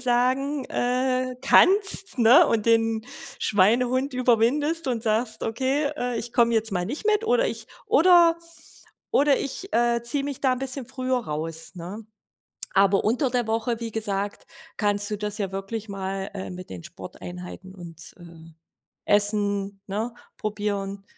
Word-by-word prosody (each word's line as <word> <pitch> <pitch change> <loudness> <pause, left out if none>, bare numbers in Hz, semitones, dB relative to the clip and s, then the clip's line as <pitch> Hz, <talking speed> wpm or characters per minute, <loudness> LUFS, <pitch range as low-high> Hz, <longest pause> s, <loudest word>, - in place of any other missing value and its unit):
sagen, 255 +3 +1
äh, 255 +1 0
kannst, 390 -2 +3
ne? 235 +3 +7
Und 220 -2 0
den 225 -1 +2 0.3
Schweinehund 250 +7 +2
überwindest 255 +7 +2
und 235 -3 -1
sagst: 220 0 -1
„Okay, 265 +6 0
äh, 245 -4 -2
ich 230 +1 -6
komme 235 -1 +3
jetzt 220 -1 0
mal 180 -1 -1
nicht 280 - -5
mit 430 +1 +2
oder - - +3
ich - - -5 0.2
oder 340 -1 +6 0.7
oder 285 -1 +4
ich, 370 +8 -5
äh, 235 0 +2
ziehe 275 +4 -1
mich 280 -2 -5
da 265 -2 +3
'n 255 - -2
bisschen 270 -1 -4
früher 255 0 -1
raus”, 160 -5 -5
ne? 185 +5 -8 0.7
Aber 195 0 +4
unter 250 +5 +1
der 245 -1 0
Woche, 225 +1 -1
wie 230 -1 -5
gesagt, 205 -2 -3 0.3
kannst 205 -1 +1
du 210 - -1
das 210 0 -4
ja 200 -3 -3
wirklich 195 +3 -5
mal, 195 0 -4
äh, 190 -2 -6
mit 185 0 -9
den 90 -2 -8
Sporteinheiten 180 +1 -9
und, 165 -3 -11
ähm, 165 -2 -14 0.5
Essen, 205 -1 +1
ne, 215 +5 -3 0.2
probieren. 200 -2 -3
225 Hz, 150 wpm, -25 LUFS, 200-255 Hz, 0.7 s, ne